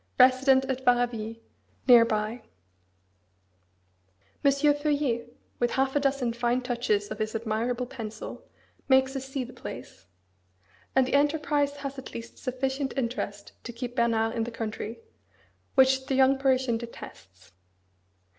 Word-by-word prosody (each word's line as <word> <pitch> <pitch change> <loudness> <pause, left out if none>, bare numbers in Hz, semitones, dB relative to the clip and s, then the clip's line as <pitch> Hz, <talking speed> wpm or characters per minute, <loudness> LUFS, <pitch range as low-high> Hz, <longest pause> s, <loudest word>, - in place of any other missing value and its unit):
resident 260 +1 +5
at 265 -1 -3
Varaville, 240 -3 +1 0.5
near 240 -2 +9
by. 220 +1 -2 2.0
M. 280 - +6
Feuillet, 285 -4 0 0.2
with 240 - +2
half 265 +1 +1
a - - +4
dozen 275 -4 0
fine 240 +1 +1
touches 235 -5 -1
of - - -5
his 215 0 -2
admirable 230 +3 -1
pencil 225 -4 -7 0.4
makes 265 0 +4
us 270 0 -4
see 270 -1 -2
the 250 - -10
place. - - -9 0.9
And 265 -1 +5
the - - -4
enterprise 290 0 +2
has 275 -1 -6
at 265 - -10
least 230 0 -8
sufficient 265 +2 -2
interest 230 -5 -3
to 240 - -6
keep 245 +1 -6
Bernard 225 -2 +2
in 230 - 0
the 235 - -4
country, 225 - -5 0.7
which 265 0 +4
the 270 - 0
young 265 0 +4
Parisian 260 -3 +2
detests. 95 - -11
250 Hz, 135 wpm, -27 LUFS, 230-270 Hz, 2.0 s, near